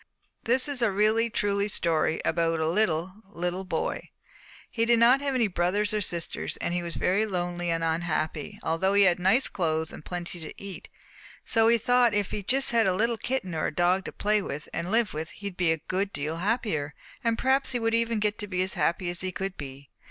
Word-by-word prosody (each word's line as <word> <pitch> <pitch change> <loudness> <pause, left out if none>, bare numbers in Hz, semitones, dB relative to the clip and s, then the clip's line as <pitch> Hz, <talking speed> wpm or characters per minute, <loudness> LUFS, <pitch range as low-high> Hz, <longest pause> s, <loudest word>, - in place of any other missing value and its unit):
"This 255 +3 +3
is 280 -3 -1
a 230 -3 +3
really 215 +4 +2
truly 200 -1 0
story 165 -5 +1
about 165 0 +1
a 160 - 0
little, 185 +1 0
little 180 0 -3
boy. 185 - -3 0.6
He 230 - 0
did 235 0 +4
not 245 +4 +5
have 280 -2 -1
any 235 -4 +3
brothers 200 +3 0
or 210 - 0
sisters, 170 -3 -3
and 175 - -2
he 175 - 0
was 170 -1 -4
very 205 +4 +1
lonely 175 -2 -2
and 165 0 0
unhappy 160 -2 -2
although 190 +5 +1
he 200 - +6
had 180 -2 +3
nice 195 +9 +4
clothes 160 -3 -1
and - - -10
plenty 175 +1 -5
to 160 - -8
eat. 200 -2 -9 0.6
So 225 -1 +4
he 235 +1 +5
thought 245 -1 +3
if 205 -2 0
he 210 - -3
just 265 +7 +1
had 230 -3 +3
a 185 - +2
little 230 +4 +1
kitten 230 -6 -3
or 155 - -1
a - - -3
dog 180 +2 +2
to - - -5
play 210 0 +1
with 150 -5 -6
and 170 +2 -3
live 225 0 +1
with 155 +2 -4
he 200 - -12
would 180 - -16
be 175 -3 +2
a 160 - +1
good 195 +2 -1
deal 155 +1 -3
happier, 180 - -1 0.3
and 230 -1 +1
perhaps 265 +1 +2
he 245 - 0
would 225 0 0
even 230 0 +1
get 210 0 0
to 205 - -5
be 185 -2 0
as 190 - -1
happy 170 +1 0
as 175 - -4
he 185 0 -2
could 195 +1 -4
be. 140 -1 -9
190 Hz, 225 wpm, -27 LUFS, 170-225 Hz, 0.6 s, he